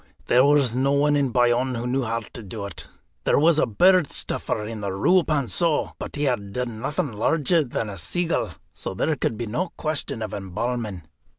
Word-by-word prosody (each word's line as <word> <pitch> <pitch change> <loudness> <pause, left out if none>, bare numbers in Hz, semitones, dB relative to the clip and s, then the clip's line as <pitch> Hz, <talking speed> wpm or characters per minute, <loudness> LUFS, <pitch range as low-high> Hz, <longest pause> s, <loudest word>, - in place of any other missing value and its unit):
There 125 +1 +5
was 140 -4 +3
no 135 +2 +2
one 145 +1 +3
in 140 -2 +2
Bayonne 125 +1 +2
who 120 +1 -3
knew 130 +2 0
how 115 -1 -1
to 115 - -10
do 100 0 -6
it. 100 -6 -7 0.4
There - - +3
was 155 +1 +4
a - - +3
bird 180 - +4
stuffer 105 - -2
in 110 -1 -6
the 100 -1 -2
Rue 180 - +4
Pannceau, 155 +2 0
but - - -6
he 145 - -1
had 105 -8 -1
done 120 -2 -3
nothing 145 +4 -2
larger 160 - +2
than 120 -4 -3
a 100 -3 -6
seagull. 175 - -1 0.2
So 95 - -6
there 155 +10 +1
could 115 -4 -1
be 120 - -3
no 160 - -2
question 155 -7 -2
of 105 - -5
embalming. 105 0 -3
125 Hz, 200 wpm, -24 LUFS, 110-150 Hz, 0.4 s, There